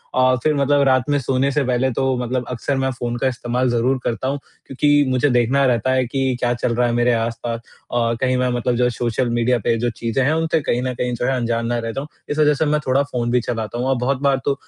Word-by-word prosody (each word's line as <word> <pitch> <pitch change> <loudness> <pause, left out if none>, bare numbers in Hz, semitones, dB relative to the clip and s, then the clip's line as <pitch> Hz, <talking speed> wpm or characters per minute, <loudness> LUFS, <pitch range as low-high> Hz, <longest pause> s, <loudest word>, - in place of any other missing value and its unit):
औ 130 0 +4
फिर 155 - +3
मतलब 140 0 +2
रात 130 0 +2
में 145 - +3
सोने 130 +1 0
से 145 +1 +1
पहले 125 +1 +1
तो 135 - -1
मतलब 125 0 -2
अक्सर 125 +3 -2
मैं 135 0 0
फ़ोन 120 -1 -4
का 130 - 0
इस्तेमाल 125 0 -1
ज़रूर 120 +3 +1
करता 115 +2 -2
हूँ, 140 +2 -1 0.3
क्योंकि 145 +2 +2
मुझे 130 +3 +2
देखना 125 +3 +2
रहता 125 0 +1
है 130 -1 +2
कि 130 +1 -1
क्या 120 -1 +1
चल 120 0 -1
रहा 120 +1 +2
है 120 - -1
मेरे 120 +1 +2
आस-पास। 115 0 -2 0.3
अ, 115 -1 +1
कहीं 130 -1 +2
मैं 125 0 +1
मतलब 120 0 0
जो 125 +1 +2
सोशल 120 +1 -1
मीडिया 120 +1 +1
पे 115 - +2
जो 120 +1 0
चीज़ें 115 +3 -1
हैं, 145 +4 +2
उनसे 160 0 +1
कहीं 125 -3 -1
न 130 0 -2
कहीं 125 0 -2
जो 120 - -2
है, 135 +1 +1
अनजान 115 -1 -1
ना 120 0 0
रह 115 0 -3
जाऊँ, 135 +5 -5 0.2
इस 145 - -2
वज़ह 150 -1 +5
से 150 - 0
मैं 150 0 +1
थोड़ा 130 +2 +3
फ़ोन 120 -4 -3
भी 125 0 +2
चलाता 115 -1 -4
हूँ 125 +2 -1
और 135 - +2
बहुत 135 0 0
बार 140 -1 +2
तो 140 - +2
125 Hz, 260 wpm, -20 LUFS, 120-135 Hz, 0.3 s, वज़ह